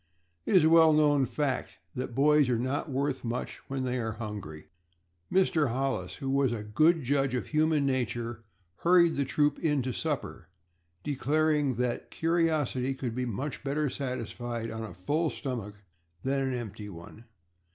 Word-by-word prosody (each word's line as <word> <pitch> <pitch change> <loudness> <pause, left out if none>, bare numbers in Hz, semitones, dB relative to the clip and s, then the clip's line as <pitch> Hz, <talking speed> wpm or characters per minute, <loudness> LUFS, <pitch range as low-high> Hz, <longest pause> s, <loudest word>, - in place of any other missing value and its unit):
It - - +2
is 180 - +7
a 160 - +5
well 165 -1 +7
known 145 -3 +4
fact 145 -4 -2 0.2
that 125 -1 -5
boys 145 0 +4
are 120 - +2
not 130 +5 -2
worth 135 0 -1
much 120 +1 -3
when 135 -1 -3
they 125 0 -1
are 110 -2 -2
hungry. 105 -9 -7 0.7
Mr. 170 -6 +3
Hollis, 125 -7 -2
who 135 -2 -3
was 135 -2 +2
a 110 -3 -3
good 155 +10 +3
judge 135 0 +1
of 125 - -2
human 155 -1 +2
nature, 120 -3 -2 0.3
hurried 170 - +4
the 140 - 0
troop 145 +3 +1
into 135 -5 0
supper, 130 - -3 0.6
declaring 150 0 +1
that 125 0 -2
curiosity 155 -6 0
could 125 -3 -4
be 125 +1 -2
much 130 +6 -4
better 145 0 0
satisfied 120 -3 -4
on 110 0 -5
a 105 -6 -7
full 150 - 0
stomach 120 -9 -5 0.5
than 135 +1 0
an 135 -1 -1
empty 105 -3 -6
one. 95 +5 -11
135 Hz, 160 wpm, -29 LUFS, 120-150 Hz, 0.7 s, is